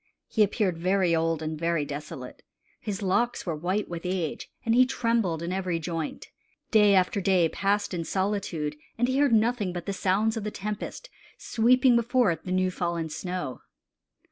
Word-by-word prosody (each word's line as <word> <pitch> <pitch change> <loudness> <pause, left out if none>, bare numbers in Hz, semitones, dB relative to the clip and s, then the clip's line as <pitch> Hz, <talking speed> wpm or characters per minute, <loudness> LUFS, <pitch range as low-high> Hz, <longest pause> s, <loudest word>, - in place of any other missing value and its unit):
He 220 - 0
appeared 200 -4 +2
very 185 -1 +2
old 165 -1 0
and 155 0 -4
very 165 -2 0
desolate. 145 -3 -7 0.4
His 205 -1 -4
locks 235 +6 +1
were 170 -4 -2
white 185 +7 -1
with 170 -1 -5
age, 180 -4 -3 0.2
and 230 - +2
he 250 +2 +7
trembled 230 -10 0
in 175 +2 -2
every 185 -3 -1
joint. 165 -1 -4 0.4
Day 210 -2 +6
after 185 +2 +2
day 185 -3 +3
passed 200 +3 0
in 170 -2 -2
solitude, 185 -4 -2 0.2
and 245 +1 +2
he 260 +2 +1
heard 285 -3 +4
nothing 225 -3 +2
but 175 -1 -5
the 200 - -2
sounds 200 +4 +1
of 225 - -3
the 210 - -2
tempest, 210 - -6 0.3
sweeping 250 +2 +3
before 235 -2 +3
it 165 - -5
the 185 - -4
new 185 0 +2
fallen 170 -2 -2
snow. 175 -4 -4
190 Hz, 175 wpm, -27 LUFS, 170-215 Hz, 0.4 s, he